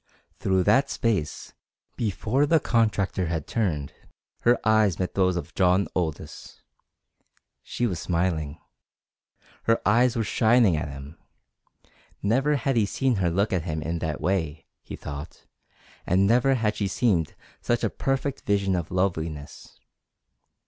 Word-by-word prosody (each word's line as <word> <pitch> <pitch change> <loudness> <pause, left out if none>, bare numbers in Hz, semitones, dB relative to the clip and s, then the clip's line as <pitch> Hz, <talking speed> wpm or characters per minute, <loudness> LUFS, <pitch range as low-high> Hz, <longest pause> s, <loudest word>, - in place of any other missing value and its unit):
Through 95 -1 +1
that 135 +8 +3
space, 100 -10 -2 0.4
before 115 +6 0
the 165 +1 +4
contractor 105 - 0
had 80 -3 -3
turned, 85 -11 -2 0.5
her 120 +1 +3
eyes 110 -5 +3
met 90 -1 -2
those 95 -2 +2
of 85 -2 -5
John 95 +2 +3
Aldous. 80 -5 -5 1.0
She 120 - -3
was 90 -8 -2
smiling. 85 -3 -1 1.1
Her 115 0 +3
eyes 120 +4 +4
were 115 - 0
shining 110 -3 +3
at 75 - -3
him. 70 +2 -10 1.0
Never 135 +8 +2
had 135 -1 0
he 105 -3 +3
seen 130 +1 0
her 90 -2 +1
look 100 +5 0
at 90 -3 -1
him 80 -3 -3
in 85 +2 -2
that 75 -2 -3
way, 80 -5 -1 0.2
he - - -8
thought, 75 +3 -8 0.6
and 95 +2 +3
never 125 +5 +3
had 110 -3 0
she 100 - 0
seemed 95 -6 0 0.3
such 120 0 0
a - - +2
perfect 135 0 -2
vision 100 -2 +1
of 85 -3 -3
loveliness. 80 -5 -3
95 Hz, 140 wpm, -25 LUFS, 85-115 Hz, 1.1 s, the